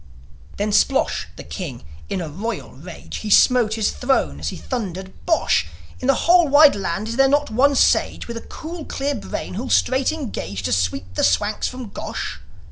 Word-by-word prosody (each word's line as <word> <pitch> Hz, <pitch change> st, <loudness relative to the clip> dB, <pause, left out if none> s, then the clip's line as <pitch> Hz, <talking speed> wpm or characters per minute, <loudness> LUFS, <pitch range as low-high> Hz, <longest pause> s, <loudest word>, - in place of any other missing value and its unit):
Then 210 Hz, +1 st, -1 dB
Splosh, 265 Hz, +6 st, +2 dB
the -, -, -9 dB
king, 150 Hz, -, -7 dB, 0.3 s
in 185 Hz, -, -2 dB
a 165 Hz, -, -4 dB
royal 200 Hz, +8 st, -5 dB
rage, 165 Hz, +6 st, -9 dB
He 215 Hz, -, -5 dB
smote 225 Hz, 0 st, +5 dB
his 220 Hz, -2 st, +1 dB
throne 80 Hz, -, 0 dB
as 75 Hz, +1 st, -2 dB
he -, -, -7 dB
thundered, 190 Hz, -6 st, -5 dB
"Bosh! 325 Hz, -, +2 dB, 0.3 s
In 255 Hz, -, -3 dB
the 275 Hz, -, +5 dB
whole 345 Hz, -1 st, +6 dB
wide 290 Hz, +1 st, +7 dB
land 195 Hz, +2 st, -3 dB
is 230 Hz, -, -4 dB
there 270 Hz, 0 st, +5 dB
not 290 Hz, -2 st, +1 dB
one 280 Hz, +5 st, +3 dB
sage -, -, +2 dB
With 235 Hz, -1 st, -5 dB
a -, -, -6 dB
cool, 330 Hz, 0 st, -8 dB
clear 285 Hz, 0 st, -2 dB
brain, 235 Hz, -, -5 dB
who'll 240 Hz, +7 st, -4 dB
straight 260 Hz, +1 st, +2 dB
engage 155 Hz, -, -5 dB
To 85 Hz, -, 0 dB
sweep 95 Hz, -1 st, -1 dB
the -, -, -1 dB
Swanks 210 Hz, 0 st, +1 dB
from 250 Hz, -3 st, -7 dB
Gosh?" -, -, -5 dB
225 Hz, 190 wpm, -21 LUFS, 180-270 Hz, 0.3 s, wide